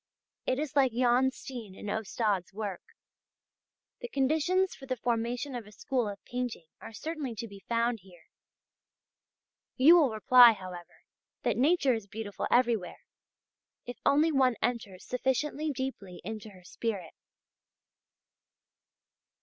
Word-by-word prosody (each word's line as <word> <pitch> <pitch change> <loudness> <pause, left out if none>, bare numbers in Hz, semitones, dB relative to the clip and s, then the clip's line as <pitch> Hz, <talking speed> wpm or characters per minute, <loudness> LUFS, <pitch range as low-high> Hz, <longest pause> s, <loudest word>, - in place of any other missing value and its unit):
It 255 - +1
is 295 -1 -3
like 265 -4 +4
Jan 250 +2 +3
Steen 240 -7 -9
and - - -8
Ostade's 205 -2 -1
work. 205 -4 -4 1.2
The 485 - -6
conditions 320 - +1
for 270 - -12
the 255 -1 -2
formation 240 +3 -1
of 235 -4 -6
a - - -13
school 245 0 -1
of 200 -1 -9
painting 245 -8 -4
are - - -10
certainly 290 +1 -5
to 230 +2 -5
be 200 -2 -12
found 235 0 +1
here. 175 -3 -18 1.5
You 310 +7 +7
will 300 -6 +4
reply, 235 +2 +7
however, 185 -3 -10 0.4
that 240 -4 +1
nature 280 +2 +3
is 220 -3 -4
beautiful 205 0 -5
everywhere, 230 -8 +1 0.8
if 245 -2 -8
only 300 +3 +4
one 260 -4 +3
enters 220 -7 -3
sufficiently 270 +4 -1
deeply 260 -10 -5
into 215 +1 -6
her 185 -3 -16
spirit. 190 -2 -4
240 Hz, 130 wpm, -30 LUFS, 210-265 Hz, 1.5 s, You